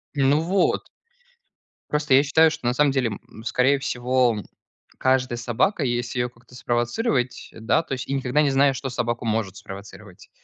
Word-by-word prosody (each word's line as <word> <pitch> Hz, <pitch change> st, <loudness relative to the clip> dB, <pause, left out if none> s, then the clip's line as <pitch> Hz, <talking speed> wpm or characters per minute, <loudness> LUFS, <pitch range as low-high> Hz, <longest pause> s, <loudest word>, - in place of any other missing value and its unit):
Ну, 140 Hz, +2 st, +3 dB
вот. 185 Hz, +3 st, +1 dB, 1.1 s
Просто 150 Hz, -2 st, +1 dB
я 135 Hz, +2 st, +7 dB
считаю, 160 Hz, +3 st, +4 dB
что 155 Hz, -5 st, -7 dB
на 120 Hz, -, +2 dB
самом 145 Hz, +2 st, +3 dB
деле, 130 Hz, -3 st, +1 dB, 0.2 s
м, 110 Hz, -, -13 dB
скорее 130 Hz, +4 st, +2 dB
всего, 125 Hz, -2 st, +1 dB, 0.6 s
каждая 130 Hz, -2 st, +1 dB
собака, 120 Hz, -, 0 dB
если 120 Hz, -1 st, -2 dB
её 120 Hz, 0 st, 0 dB
как-то 120 Hz, +1 st, -20 dB
спровоцировать, 125 Hz, -, -1 dB
да- 110 Hz, +8 st, 0 dB
то -, -, -18 dB
есть 130 Hz, -1 st, -4 dB
и 135 Hz, -, -2 dB
никогда 135 Hz, +1 st, +1 dB
не 145 Hz, -, +3 dB
знаешь, 135 Hz, 0 st, +3 dB
что 135 Hz, -, -5 dB
собаку 120 Hz, -1 st, -2 dB
может 110 Hz, -3 st, -1 dB
спровоцировать. 100 Hz, -1 st, -11 dB
125 Hz, 165 wpm, -23 LUFS, 120-140 Hz, 1.1 s, я